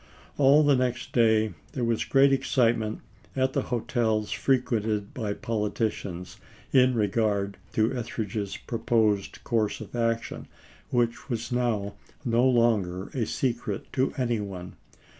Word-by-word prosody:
All 140 Hz, +2 st, +6 dB
the 145 Hz, -1 st, +5 dB
next 125 Hz, -1 st, -1 dB
day 110 Hz, -2 st, +3 dB, 0.2 s
there 130 Hz, -, -2 dB
was 115 Hz, -1 st, 0 dB
great 135 Hz, 0 st, +5 dB
ex 135 Hz, 0 st, -1 dB
citement 115 Hz, -3 st, +1 dB, 0.3 s
at 130 Hz, 0 st, +1 dB
the -, -, +1 dB
hotels 115 Hz, -3 st, 0 dB
frequented 110 Hz, -3 st, 0 dB
by 110 Hz, -5 st, -2 dB
politicians, 105 Hz, -6 st, -3 dB, 0.4 s
in 130 Hz, -1 st, +5 dB
regard 105 Hz, -2 st, 0 dB, 0.2 s
to 110 Hz, +4 st, +1 dB
Etheridge's 110 Hz, -4 st, -3 dB
proposed 110 Hz, -4 st, 0 dB
course 110 Hz, -3 st, 0 dB
of -, -, -9 dB
action, 115 Hz, -1 st, -1 dB, 0.4 s
which 120 Hz, +1 st, 0 dB
was 120 Hz, 0 st, -3 dB
now 115 Hz, -5 st, 0 dB, 0.3 s
no 120 Hz, 0 st, +2 dB
longer 105 Hz, -7 st, +1 dB
a 120 Hz, -5 st, -2 dB
secret 120 Hz, -6 st, -2 dB
to 130 Hz, 0 st, +1 dB
any 120 Hz, -3 st, 0 dB
one. 95 Hz, -3 st, -6 dB
115 Hz, 130 wpm, -27 LUFS, 105-125 Hz, 0.4 s, All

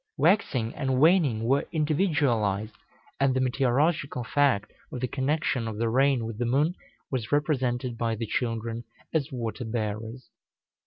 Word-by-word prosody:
Waxing 140 Hz, -, +2 dB
and 130 Hz, -1 st, -1 dB
waning 150 Hz, -8 st, +4 dB
were 135 Hz, +5 st, +1 dB
individualized, 140 Hz, -, +1 dB, 0.5 s
and 135 Hz, -1 st, +3 dB
the -, -, +2 dB
meteorological 135 Hz, +2 st, +1 dB
fact 135 Hz, -5 st, +1 dB, 0.2 s
of 125 Hz, -, -5 dB
the 130 Hz, -, -1 dB
connection 135 Hz, -2 st, -1 dB
of 110 Hz, -2 st, -5 dB
the 115 Hz, +1 st, 0 dB
rain 130 Hz, 0 st, +2 dB
with 115 Hz, -1 st, -6 dB
the 120 Hz, -, 0 dB
moon 145 Hz, +7 st, +2 dB, 0.4 s
was 125 Hz, -5 st, -3 dB
represented 130 Hz, -5 st, 0 dB
by 115 Hz, -1 st, 0 dB
the 115 Hz, +1 st, -3 dB
children 115 Hz, 0 st, -2 dB, 0.3 s
as 155 Hz, -2 st, 0 dB
water 120 Hz, -1 st, -4 dB
bearers. 110 Hz, +1 st, -4 dB
125 Hz, 145 wpm, -27 LUFS, 115-145 Hz, 0.5 s, waning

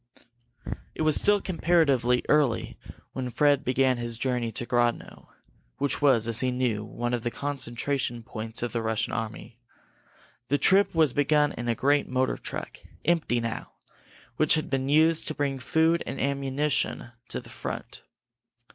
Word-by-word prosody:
It -, -, -2 dB
was 155 Hz, -1 st, +3 dB
still 205 Hz, 0 st, +3 dB
comparatively 145 Hz, -10 st, +2 dB
early 145 Hz, -6 st, +2 dB, 0.4 s
when 130 Hz, -1 st, -3 dB
Fred 145 Hz, +2 st, +2 dB
began 130 Hz, 0 st, +2 dB
his 120 Hz, -1 st, -3 dB
journey 125 Hz, -2 st, -1 dB
to 120 Hz, -, -4 dB
Grodno, 120 Hz, -1 st, -1 dB, 0.5 s
which 140 Hz, +1 st, 0 dB
was, 125 Hz, -6 st, +4 dB
as 115 Hz, 0 st, +3 dB
he 130 Hz, -, +2 dB
knew, 125 Hz, -4 st, -1 dB
one 120 Hz, +2 st, -4 dB
of 120 Hz, -, -1 dB
the 120 Hz, -, -1 dB
concentration 125 Hz, -1 st, -3 dB
points 110 Hz, +1 st, -5 dB
of 120 Hz, -, -3 dB
the 115 Hz, -, -1 dB
Russian 110 Hz, 0 st, -1 dB
army. 115 Hz, 0 st, -5 dB, 0.9 s
The 145 Hz, -, +2 dB
trip 195 Hz, +6 st, +4 dB
was 155 Hz, -5 st, +3 dB
begun 145 Hz, 0 st, +3 dB
in 120 Hz, -, -6 dB
a 115 Hz, -, +1 dB
great 145 Hz, +4 st, +2 dB
motor 130 Hz, 0 st, 0 dB
truck, -, -, -7 dB, 0.3 s
empty 165 Hz, -8 st, +1 dB
now, 115 Hz, -1 st, -5 dB, 0.6 s
which 155 Hz, -, +4 dB
had 155 Hz, -, -3 dB
been 135 Hz, 0 st, -1 dB
used 160 Hz, +2 st, +4 dB
to 155 Hz, -, -3 dB
bring 140 Hz, -2 st, -1 dB
food 160 Hz, +6 st, +2 dB
and 135 Hz, -, -5 dB
ammunition 140 Hz, -2 st, 0 dB, 0.2 s
to -, -, -3 dB
the -, -, -13 dB
front. -, -, -6 dB
130 Hz, 155 wpm, -27 LUFS, 120-145 Hz, 0.9 s, was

